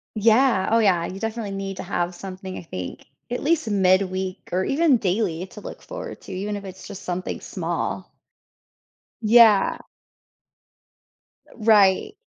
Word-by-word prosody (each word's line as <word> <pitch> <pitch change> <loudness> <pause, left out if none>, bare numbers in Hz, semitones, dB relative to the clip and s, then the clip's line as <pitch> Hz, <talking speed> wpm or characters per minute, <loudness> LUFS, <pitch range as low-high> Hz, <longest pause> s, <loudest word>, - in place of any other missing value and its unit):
Yeah. 225 -1 +3
Oh, 230 - +5
yeah, 180 -6 +3
you 190 +2 -6
definitely 225 -1 -4
need 195 -1 -5
to - - -5
have 175 0 -2
something, 190 0 -7
I - - -6
think. 90 - -7 0.2
At 245 - -3
least 315 -5 +1
midweek, 185 -1 +1
or 185 - +1
even 285 - +3
daily 185 -4 -1
to 210 - -12
look - - -9
forward - - -8
to, - - -11
even 200 +3 -3
if 200 - -6
it's 190 0 -10
just 200 -2 -9
something 180 0 -4
small. - - -4 1.1
Yeah. 220 -2 +6 1.8
Right. 215 - +4
195 Hz, 140 wpm, -23 LUFS, 185-225 Hz, 1.8 s, Yeah